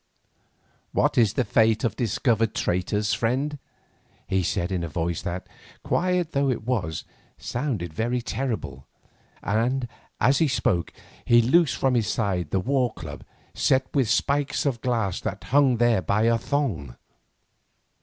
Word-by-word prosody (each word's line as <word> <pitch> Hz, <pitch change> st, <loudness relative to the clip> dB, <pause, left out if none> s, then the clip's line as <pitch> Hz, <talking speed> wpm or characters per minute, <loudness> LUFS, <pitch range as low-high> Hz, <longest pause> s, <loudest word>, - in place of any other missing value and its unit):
"What -, -, +2 dB
is 110 Hz, -4 st, +4 dB
the 130 Hz, -, 0 dB
fate 110 Hz, +1 st, +3 dB
of 120 Hz, -, 0 dB
discovered 115 Hz, -1 st, 0 dB
traitors, 105 Hz, +4 st, 0 dB
friend?" 135 Hz, +5 st, -1 dB, 0.7 s
he 95 Hz, 0 st, +1 dB
said 85 Hz, +1 st, -1 dB
in 90 Hz, -2 st, -1 dB
a -, -, -2 dB
voice 85 Hz, +3 st, -2 dB
that, 90 Hz, +1 st, -4 dB, 0.4 s
quiet 180 Hz, -2 st, 0 dB
though 140 Hz, 0 st, +1 dB
it 120 Hz, -4 st, -2 dB
was, 95 Hz, -11 st, -2 dB, 0.3 s
sounded 120 Hz, -, -3 dB
very 120 Hz, +7 st, -1 dB
terrible; 120 Hz, -, -4 dB, 0.6 s
and, 120 Hz, +5 st, 0 dB, 0.3 s
as 135 Hz, +2 st, +3 dB
he 160 Hz, -, +4 dB
spoke, 115 Hz, -9 st, 0 dB, 0.3 s
he 120 Hz, -, +5 dB
loosed 140 Hz, +7 st, +3 dB
from 135 Hz, -1 st, +2 dB
his 115 Hz, -4 st, +1 dB
side 95 Hz, -8 st, -1 dB
the 95 Hz, -, +1 dB
war 125 Hz, +3 st, +1 dB
club 80 Hz, -4 st, -8 dB, 0.3 s
set 130 Hz, 0 st, +1 dB
with 135 Hz, -6 st, +2 dB
spikes 140 Hz, +5 st, +1 dB
of 125 Hz, -5 st, -1 dB
glass 115 Hz, -7 st, -1 dB
that -, -, -4 dB
hung 135 Hz, -2 st, +3 dB
there 120 Hz, -4 st, +3 dB
by 100 Hz, +6 st, +1 dB
a 115 Hz, 0 st, +3 dB
thong. 105 Hz, -, -2 dB
115 Hz, 145 wpm, -25 LUFS, 95-130 Hz, 0.7 s, he